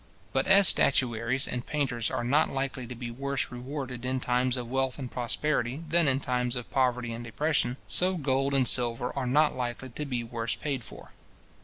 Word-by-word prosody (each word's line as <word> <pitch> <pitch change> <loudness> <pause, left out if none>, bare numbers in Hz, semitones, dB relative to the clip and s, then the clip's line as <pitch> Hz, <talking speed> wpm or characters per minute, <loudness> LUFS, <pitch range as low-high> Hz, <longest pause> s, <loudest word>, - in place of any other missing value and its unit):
But 135 - +1
as 195 0 +7
statuaries 125 -2 +2
and 125 -1 -3
painters 120 -7 -1
are - - -2
not 140 +6 +3
likely 135 -2 -3
to 125 - -7
be 120 0 -6
worse 140 +4 -2
rewarded 125 0 -6
in 130 +1 -1
times 125 0 +1
of 120 -1 -4
wealth 130 +1 -1
and 130 -4 -6
prosperity, 125 +2 -1
than 165 0 +4
in 135 0 +3
times 125 -2 -1
of 125 -1 -6
poverty 125 -3 +1
and 115 +1 -6
depression, 125 +1 0
so 185 +1 +2
gold 135 -1 +1
and 130 -2 +3
silver 120 0 +2
are 135 -2 -2
not 150 +4 +3
likely 125 +1 -4
to 150 +5 -5
be 125 -3 -2
worse 115 0 -3
paid 140 -5 -3
for. - - -12
130 Hz, 190 wpm, -28 LUFS, 120-140 Hz, -, as